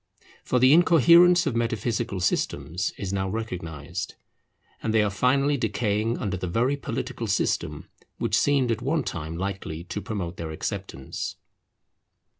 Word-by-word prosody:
For 125 - +1
the 130 +3 +6
incoherence 175 +2 +6
of 135 - -1
metaphysical 115 -3 -1
systems 80 0 -1
is 100 -1 -4
now 95 -1 -1
recognized, 90 -5 -5 0.7
and 110 0 -1
they 110 - +5
are 105 - 0
finally 135 +7 +2
decaying 110 -1 0
under 100 -4 -2
the 90 - -4
very 120 +10 +1
political 120 -4 -4
system 100 - -1 0.3
which 105 - 0
seemed 135 0 +3
at 110 - -1
one - - 0
time 80 +1 -5
likely 95 -4 -4
to 90 +4 -5
promote 95 -6 -4
their 80 -1 -5
acceptance. 70 -3 -5
105 Hz, 140 wpm, -26 LUFS, 90-125 Hz, 0.7 s, the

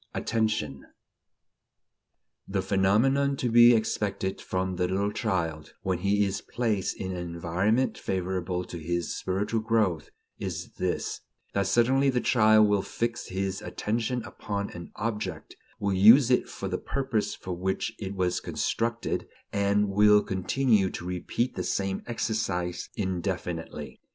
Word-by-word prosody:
VI - - -1
ATTENTION 110 -12 -1 1.6
The 95 -1 -1
phenomenon 135 +9 +2
to 125 - 0
be 120 +1 +8
expected 100 -3 -1
from 95 0 -2
the 90 0 +1
little 100 +3 0
child, 85 - -2
when 95 -2 0
he 100 +2 +2
is 95 0 -2
placed 110 -5 -1
in 95 -1 -4
an 90 - -4
environment 90 +8 0
favorable 90 -1 -2
to 85 - -7
his 85 +2 -2
spiritual 100 +4 -1
growth, 105 -9 +1 0.3
is 90 -3 -4
this: 90 -1 -2 0.3
that 100 -1 +1
suddenly 130 +6 +3
the 125 -2 +1
child 110 -3 +5
will 105 -1 +2
fix 115 +4 -3
his 95 +1 -2
attention 115 +3 -2
upon 100 -2 -4
an 85 -1 -9
object, 105 -7 -4 0.2
will 100 -1 0
use 115 +7 +7
it 125 - +2
for 100 - -5
the 90 -1 -2
purpose 130 -6 -1
for 90 - -6
which 95 +2 -2
it 100 -1 -5
was 90 -2 0
constructed, 115 0 -2 0.3
and 100 +1 +2
will 105 +1 +5
continue 100 +1 +2
to 90 - -7
repeat 90 +7 -2
the 90 - -3
same 95 +2 -1
exercise 100 -7 -2
indefinitely. 90 -4 -4
100 Hz, 140 wpm, -27 LUFS, 90-110 Hz, 1.6 s, be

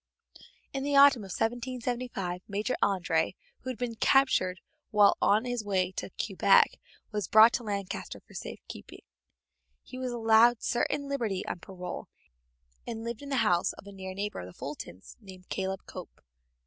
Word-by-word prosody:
In 270 - -2
the 285 +1 0
autumn 280 -4 +7
of 195 - -9
1775 240 -4 -3
Major 210 +5 -1
André, 175 -4 +1 0.2
who 255 - -7
had 255 - -4
been 240 0 -3
captured 220 -7 +3 0.3
while 205 -2 +5
on 210 +4 +3
his 245 -2 -2
way 190 -3 0
to - - -5
Quebec, - - +4 0.3
was 210 -2 -2
brought 220 +2 +7
to 245 - -1
Lancaster 200 -3 -4
for - - -20
safe - - -7
keeping. - - -10 0.8
He 255 - -9
was 255 -1 -2
allowed 230 0 +4
certain 285 +4 0
liberty 230 -9 -2
on - - -4
parole, 180 0 -7 0.8
and 225 -1 -5
lived 235 +1 -5
in 285 - -8
the 270 -2 +2
house 175 -1 +2
of - - -14
a 200 - -10
near 190 -1 -7
neighbor 205 +1 -3
of 90 - -7
the 90 - -12
Fultons, 115 -10 -8
named 185 -3 -13
Caleb 190 0 -3
Cope. - - -10
215 Hz, 165 wpm, -29 LUFS, 190-245 Hz, 0.8 s, autumn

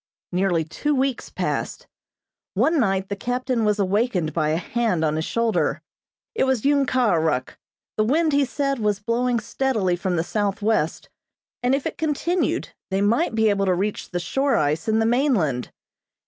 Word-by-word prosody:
Nearly 180 -2 +1
two 290 - -2
weeks 265 -1 -1
passed. - - -3 0.7
One 320 -1 +3
night 195 -5 +1
the 200 - -2
captain 245 +2 -1
was 210 0 +2
awakened 195 - 0
by 155 -2 +1
a 155 - +1
hand 185 -2 0
on 155 0 0
his 160 +1 -1
shoulder. 230 -1 0 0.5
It 450 - +1
was 265 -3 0
Ung 280 -1 +3
Kah 250 -3 +2
Ah - - +3
Ruk. 150 -5 -1 0.4
The 215 - +3
wind, 305 +7 +2
he 285 0 +4
said, 275 0 -1
was 210 -2 0
blowing 235 +3 0
steadily 220 -5 0
from 180 0 -2
the 165 - +1
southwest, 205 -3 -1 0.5
and 250 +2 +2
if 275 - -3
it - - -4
continued 320 +3 0 0.2
they 190 +1 0
might 225 +6 +2
be 220 -1 +3
able 200 -1 0
to 185 - +3
reach 200 +3 -2
the 175 - -2
shore 270 +10 0
ice 150 +2 0
and 220 0 +2
the 225 - +2
mainland. 225 - +1
215 Hz, 175 wpm, -23 LUFS, 185-260 Hz, 0.7 s, he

